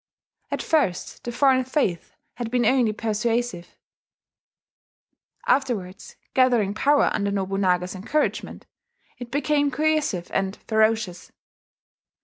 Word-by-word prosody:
At -, -, -3 dB
first 270 Hz, -, -1 dB
the 240 Hz, -, -3 dB
foreign 260 Hz, +1 st, +3 dB
faith 250 Hz, -, -2 dB, 0.2 s
had 240 Hz, -2 st, -5 dB
been 245 Hz, 0 st, +1 dB
only 245 Hz, -2 st, +3 dB
persuasive; 225 Hz, -2 st, -2 dB, 1.7 s
afterwards, 210 Hz, -9 st, -1 dB, 0.2 s
gathering 240 Hz, -6 st, +3 dB
power 285 Hz, +6 st, +3 dB
under 200 Hz, 0 st, 0 dB
Nobunaga's 190 Hz, -2 st, 0 dB
encouragement, 230 Hz, +11 st, -2 dB, 0.5 s
it 245 Hz, -1 st, -7 dB
became 290 Hz, +1 st, +1 dB
coercive 295 Hz, -, 0 dB
and 195 Hz, +1 st, 0 dB
ferocious. 220 Hz, -4 st, +1 dB
230 Hz, 100 wpm, -24 LUFS, 195-265 Hz, 1.7 s, foreign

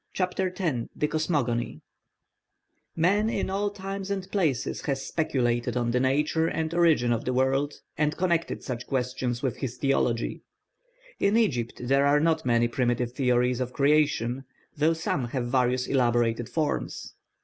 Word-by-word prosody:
CHAPTER 185 Hz, 0 st, -1 dB
X 150 Hz, -11 st, -1 dB
THE 150 Hz, -, 0 dB
COSMOGONY 140 Hz, -, -1 dB, 1.2 s
Man 200 Hz, +6 st, +2 dB
in 190 Hz, -, -1 dB
all 200 Hz, +1 st, 0 dB
times 195 Hz, 0 st, -6 dB
and 195 Hz, -2 st, -3 dB
places 160 Hz, -, 0 dB
has 135 Hz, -1 st, -1 dB
speculated 120 Hz, -7 st, 0 dB
on 120 Hz, -1 st, 0 dB
the 125 Hz, -, +2 dB
nature 150 Hz, +5 st, +1 dB
and 160 Hz, 0 st, -2 dB
origin 160 Hz, -9 st, +3 dB
of 115 Hz, -, -2 dB
the 125 Hz, -, -1 dB
world, 135 Hz, +3 st, +1 dB, 0.2 s
and 150 Hz, 0 st, +1 dB
connected 170 Hz, -2 st, 0 dB
such 125 Hz, -2 st, -5 dB
questions 125 Hz, -1 st, -2 dB
with 130 Hz, -5 st, -1 dB
his 130 Hz, -2 st, -4 dB
theology. 125 Hz, -4 st, 0 dB, 0.8 s
In 200 Hz, +3 st, +3 dB
Egypt 125 Hz, -, 0 dB
there 135 Hz, +3 st, +3 dB
are 145 Hz, +1 st, +4 dB
not 160 Hz, -2 st, +1 dB
many 120 Hz, 0 st, +3 dB
primitive 120 Hz, 0 st, 0 dB
theories 125 Hz, -1 st, +2 dB
of 125 Hz, -1 st, -3 dB
creation, 140 Hz, -3 st, +2 dB, 0.3 s
though 155 Hz, +3 st, +3 dB
some 160 Hz, -5 st, -1 dB
have 120 Hz, +1 st, -3 dB
various 125 Hz, 0 st, +2 dB
elaborated 120 Hz, -3 st, +1 dB
forms. 155 Hz, -2 st, -2 dB
135 Hz, 150 wpm, -27 LUFS, 120-160 Hz, 1.2 s, are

